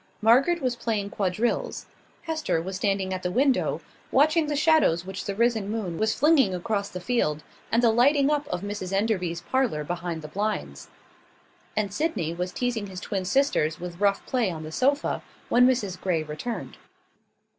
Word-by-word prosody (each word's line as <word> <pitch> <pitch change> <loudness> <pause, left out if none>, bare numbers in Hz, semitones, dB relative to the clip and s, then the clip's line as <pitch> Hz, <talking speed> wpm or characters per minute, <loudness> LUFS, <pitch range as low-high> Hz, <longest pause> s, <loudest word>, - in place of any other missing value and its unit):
Margaret 270 +9 +4
was 250 -1 +1
playing 215 -4 -2
quadrilles; 215 - -1 0.4
Hester 315 - -1
was 185 +3 -5
standing 195 -1 0
at 185 - -3
the 180 - -1
window, 265 +6 +1 0.3
watching 305 +3 +4
the 295 - -1
shadows 305 - +3
which 190 0 -6
the 200 - -3
risen 225 -2 +1
moon 205 -6 -3
was 220 0 +1
flinging 275 - +4
across 200 +2 -2
the 180 - -6
field, 165 -8 0 0.3
and 230 +2 +3
the 230 - +6
lighting 275 +5 +4
up 295 -1 0
of 180 - -3
Mrs 200 -2 -5
Enderby's 190 -5 0
parlour 230 - 0
behind 170 0 -4
the - - -6
blinds; 210 +7 -3 0.9
and 205 -2 0
Sydney 210 - -1
was 180 +1 -3
teasing 230 0 -2
his 185 -1 -7
twin 190 -1 -3
sisters 180 - +1
with 175 0 -7
rough 200 -1 +2
play 245 -6 +1
on 160 -3 -5
the 155 - -7
sofa, 280 - +1 0.3
when 245 +1 +6
Mrs 210 -8 -1
Grey 170 -4 0
returned. 155 +10 -6
205 Hz, 170 wpm, -26 LUFS, 180-255 Hz, 0.9 s, the